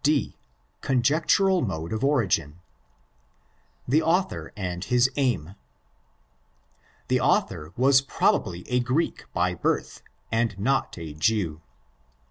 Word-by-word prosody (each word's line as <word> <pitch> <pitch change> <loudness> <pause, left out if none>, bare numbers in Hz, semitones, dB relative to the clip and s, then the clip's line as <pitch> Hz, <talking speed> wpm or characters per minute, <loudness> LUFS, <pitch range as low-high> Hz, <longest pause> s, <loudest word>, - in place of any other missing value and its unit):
D.—Conjectural 145 - 0
Mode 85 -6 -3
of 110 - -3
Origin. 90 - +1 1.3
The 145 +6 +3
Author 175 +4 0
and 90 -2 -4
his 125 +3 +2
Aim. 110 - 0 1.5
The - - +2
author 75 +1 0
was 135 +2 +5
probably 90 -9 0
a 125 0 +1
Greek 125 +7 -1
by 90 0 0
birth 85 - -2 0.3
and 115 -3 0
not 130 +4 0
8 80 -3 -8
Jew. 85 -6 0
115 Hz, 100 wpm, -25 LUFS, 85-135 Hz, 1.5 s, was